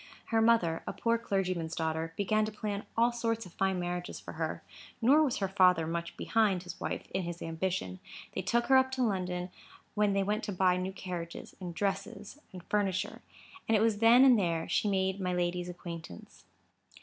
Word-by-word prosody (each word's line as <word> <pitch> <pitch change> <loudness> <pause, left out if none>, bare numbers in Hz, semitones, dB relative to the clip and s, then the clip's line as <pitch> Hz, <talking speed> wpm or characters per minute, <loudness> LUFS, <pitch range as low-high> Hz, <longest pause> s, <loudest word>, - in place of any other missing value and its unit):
Her 225 -1 +3
mother, 220 -8 +3
a - - -2
poor 230 0 +1
clergyman's 185 -6 -1
daughter, 160 0 -2
began 215 +2 +2
to 215 - -4
plan 210 -1 -4
all 235 +1 +4
sorts 230 -2 -2
of 180 - -13
fine 190 -1 0
marriages 175 0 -4
for - - -9
her; - - -4 0.4
nor 270 +7 +5
was 285 -5 +1
her 195 - 0
father 180 -4 +4
much 170 +1 -4
behind 205 -5 +1
his 175 -1 -8
wife - - -3
in 190 - -1
his 175 -1 -5
ambition. 165 - -3 0.3
They - - -2
took 235 +6 +1
her 265 - +6
up 260 0 +4
to 260 -1 0
London, 180 -4 -1 0.4
when 210 -1 +2
they 195 0 +2
went 210 +3 -1
to 210 - -3
buy 185 -1 +3
new 185 +1 -2
carriages, 180 -3 -6
and 175 -2 -6
dresses, 200 - -3
and 180 -2 -10
furniture. 195 -1 -1 0.5
And 225 - +4
it - - +1
was 220 -2 +2
then 235 +4 +7
and 250 -4 +6
there 165 -3 0
she 210 - +1
made 190 0 0
my 180 -1 -1
lady's 175 0 -1
acquaintance. 170 - -9
190 Hz, 195 wpm, -31 LUFS, 175-215 Hz, 0.5 s, then